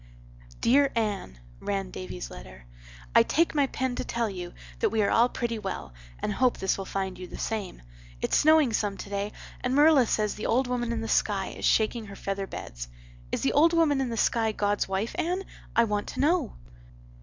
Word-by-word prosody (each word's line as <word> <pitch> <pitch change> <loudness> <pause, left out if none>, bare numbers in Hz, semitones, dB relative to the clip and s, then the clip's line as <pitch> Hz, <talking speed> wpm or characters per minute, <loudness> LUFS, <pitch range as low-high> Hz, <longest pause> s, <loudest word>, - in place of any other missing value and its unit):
"Dear 275 +3 +4
Anne," 205 - -2 0.2
ran 195 -2 -3
Davy's 90 -9 -6
letter, 60 0 -11 0.5
"I - - +8
take 335 +1 +2
my 285 -3 +3
pen 260 -1 -2
to - - -1
tell 235 -2 -1
you 180 -2 -7 0.2
that - - +2
we 220 -1 +1
are - - +1
all 235 +2 +5
pretty 235 -3 -3
well 190 - -5 0.2
and 210 - -2
hope 250 +3 +2
this 190 - +1
will 195 - -5
find 190 -1 -3
you 180 - -7
the - - -9
same. 205 - -4 0.4
It's - - 0
snowing 310 -5 +5
some 205 -2 0
today 200 +1 -3 0.3
and 250 +1 0
Marilla 290 -4 +6
says 210 -1 +1
the 210 - -4
old 255 +3 +2
woman 245 -1 -1
in 230 -1 -2
the 225 - -4
sky 200 -3 +1
is - - -5
shaking 220 +1 +2
her 200 - -9
feather 195 0 -3
beds. - - -7 0.4
Is - - -1
the 270 - +1
old 325 +4 +5
woman 305 -5 +3
in 260 - -1
the 230 - -3
sky 225 0 +2
God's 205 -1 0
wife, 195 +4 -1
Anne? 360 +3 0 0.3
I 235 - +6
want 210 -2 -1
to - - -6
know. 305 -3 +2
220 Hz, 200 wpm, -27 LUFS, 195-255 Hz, 0.5 s, I